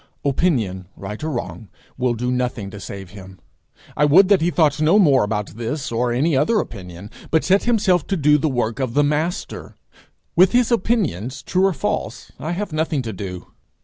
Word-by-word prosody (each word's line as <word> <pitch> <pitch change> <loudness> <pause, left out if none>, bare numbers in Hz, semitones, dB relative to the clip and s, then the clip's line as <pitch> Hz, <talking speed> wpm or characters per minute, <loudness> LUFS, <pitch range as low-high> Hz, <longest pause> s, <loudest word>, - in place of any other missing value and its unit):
Opinion, 120 - 0
right 105 +7 -7
or 160 - -2
wrong, 100 - -5 0.3
will 125 -2 0
do 125 +2 -2
nothing 125 -5 -2
to 105 - -9
save 95 -2 -8
him. 95 -3 -12 0.6
I 150 - +1
would 180 +7 +6
that 200 -4 +4
he 170 - +2
thought 155 -4 +2
no 160 +6 +4
more 145 - +5
about 105 -1 -3
this 120 +6 -4
or 120 +1 0
any 140 +6 +1
other 150 +12 +2
opinion, 90 - -6 0.2
but 160 - +2
set 195 +2 +2
himself 205 -8 +2
to 195 - -1
do 150 -1 +4
the 155 +2 0
work 120 -2 -2
of 130 -3 -2
the 145 - +4
Master. 155 +5 -2 0.6
With 185 +4 +5
his 245 -1 +3
opinions, 155 - -1
true 185 +2 +2
or 195 - 0
false, - - -4
I 160 +4 -3
have 200 -1 -4
nothing 155 -3 -1
to 110 -2 -5
do. 90 -2 -7
140 Hz, 190 wpm, -21 LUFS, 110-170 Hz, 0.6 s, would